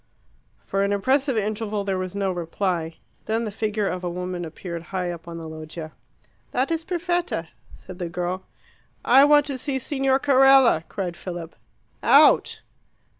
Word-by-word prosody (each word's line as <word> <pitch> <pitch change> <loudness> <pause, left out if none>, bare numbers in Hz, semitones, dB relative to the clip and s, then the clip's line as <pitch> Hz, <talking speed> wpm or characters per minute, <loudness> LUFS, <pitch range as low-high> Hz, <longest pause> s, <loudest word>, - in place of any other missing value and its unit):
For 195 - -1
an 200 - 0
impressive 260 +5 +1
interval 215 0 -2
there 195 -1 -1
was 185 +1 -5
no 195 -1 0
reply. 170 -1 -2 0.3
Then 225 +1 0
the 215 - -4
figure 210 -1 -1
of 180 -1 -3
a 175 - -1
woman 180 0 -4
appeared 170 +1 -7
high 180 0 -3
up 170 -1 -9
on 170 0 -7
the 165 -1 -7
loggia. 155 0 -8 0.6
"That 260 +5 0
is 330 0 -1
Perfetta," 345 - -2 0.3
said 185 0 -12
the 175 -2 -3
girl. 180 +2 -4 0.6
"I 270 +3 +7
want 295 0 +5
to 275 -3 -4
see 275 -1 -2
Signor 270 0 +1
Carella," 270 - +5
cried 180 -3 -4
Philip. 175 -3 -7 0.5
"Out!" - - +5
195 Hz, 160 wpm, -24 LUFS, 175-265 Hz, 0.6 s, I